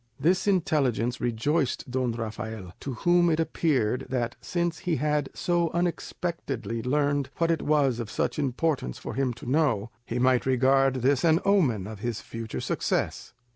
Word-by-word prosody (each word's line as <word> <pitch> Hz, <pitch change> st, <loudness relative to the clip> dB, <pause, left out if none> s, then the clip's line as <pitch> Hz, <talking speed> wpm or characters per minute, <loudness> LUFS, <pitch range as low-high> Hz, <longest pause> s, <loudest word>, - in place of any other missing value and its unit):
This 180 Hz, +8 st, +2 dB
intelligence 145 Hz, -, +1 dB
rejoiced 125 Hz, +3 st, 0 dB
Don 130 Hz, -2 st, 0 dB
Rafael, 110 Hz, -4 st, -5 dB
to 135 Hz, -, -5 dB
whom 175 Hz, +4 st, +3 dB
it 160 Hz, -1 st, +1 dB
appeared 135 Hz, -7 st, 0 dB
that 120 Hz, -3 st, -1 dB
since 175 Hz, -1 st, -1 dB
he 180 Hz, -3 st, -1 dB
had 150 Hz, -1 st, 0 dB
so 175 Hz, -1 st, +1 dB
unexpectedly 165 Hz, -, -2 dB
learned 145 Hz, +2 st, +1 dB
what 165 Hz, 0 st, +2 dB
it 165 Hz, -, 0 dB
was 140 Hz, -5 st, +2 dB
of 115 Hz, -2 st, -4 dB
such 110 Hz, -, -1 dB
importance 140 Hz, -, -1 dB
for -, -, -6 dB
him 135 Hz, -1 st, 0 dB
to -, -, -12 dB
know, 125 Hz, -6 st, +1 dB
he 120 Hz, -, -4 dB
might 125 Hz, 0 st, +3 dB
regard 130 Hz, 0 st, +3 dB
this 140 Hz, -1 st, +3 dB
an 165 Hz, -1 st, +5 dB
omen 150 Hz, -, +3 dB
of 105 Hz, -1 st, -8 dB
his 115 Hz, 0 st, -3 dB
future 115 Hz, -1 st, -6 dB
success. -, -, -2 dB
135 Hz, 160 wpm, -27 LUFS, 120-160 Hz, -, an